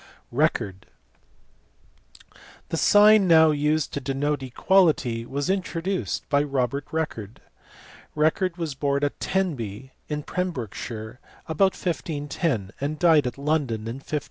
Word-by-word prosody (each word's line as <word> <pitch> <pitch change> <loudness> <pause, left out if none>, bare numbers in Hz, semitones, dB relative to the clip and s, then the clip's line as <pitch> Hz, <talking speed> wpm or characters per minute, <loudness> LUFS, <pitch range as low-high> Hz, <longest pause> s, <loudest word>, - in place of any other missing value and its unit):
Record. 115 - -1 1.8
The 165 - -2
sign 210 +2 +6
now 160 -2 +6
used 150 +1 0
to 140 - -3
denote 140 +2 -1
equality 130 -4 +2
was 140 +1 -3
in 190 0 +1
troduced 185 +2 -3
by 145 -1 +3
Robert 140 -1 -1
Record*. 115 -10 -4 0.8
Record 165 +4 +1
was 165 -4 -3
born 140 +1 -1
at 145 - -1
Tenby 130 - -2 0.2
in 150 -1 -3
Pembrokeshire 120 - -5 0.3
about 185 +4 +2
1510 145 - -2
and 145 +2 -2
died 155 -5 +4
at 125 - -5
London 140 -6 -1
in 115 +3 -5
1558. 150 +2 -3
145 Hz, 120 wpm, -25 LUFS, 130-165 Hz, 1.8 s, sign